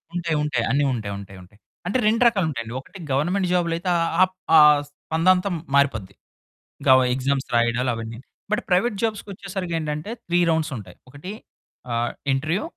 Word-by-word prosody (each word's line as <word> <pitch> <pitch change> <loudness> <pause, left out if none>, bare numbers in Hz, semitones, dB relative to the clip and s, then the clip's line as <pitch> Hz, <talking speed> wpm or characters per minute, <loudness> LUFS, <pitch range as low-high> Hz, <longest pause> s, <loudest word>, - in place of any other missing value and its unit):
ఉంటాయి, 170 -2 -1
ఉంటాయి. 150 - 0
అన్ని 145 +1 +2
ఉంటాయి, 105 -4 -4
ఉంటాయి, 95 -1 -11
ఉంటాయి. 100 +4 -19 0.3
అంటే 205 - +1
2 230 +3 +2
రకాలు 200 -7 +2
ఉంటాయండి 115 -4 -5
ఒకటి 190 - -13
గవర్నమెంట్ 180 +8 +1
జాబ్‌లో 170 -2 +1
అయితే 180 +1 -3 0.3
ఆహ్, 185 0 +4 0.2
ఆ - - +10 0.3
స్పందంత 180 +6 +1 0.3
మారిపోద్ది. 110 -9 +1 0.7
ఇంకా - - +4 0.2
ఎగ్జామ్స్ 135 +1 -1
రాయడాలు 120 +2 +2
అవన్నీని. 115 +2 -7 0.3
బట్ 210 - +1
ప్రైవేట్ 195 +4 +2
జాబ్స్‌కి 215 -2 -2
వచ్చేసరికి 185 -3 -5
ఏంటంటే 150 +6 -4 0.2
3 175 +1 +2
రౌండ్స్ 160 -2 0
ఉంటాయి. 95 -4 -11
ఒకటి 180 +8 -8 0.6
ఆహ్, 120 +1 0 0.2
ఇంటర్వ్యూ 155 - -1
155 Hz, 155 wpm, -23 LUFS, 120-185 Hz, 0.7 s, ఆ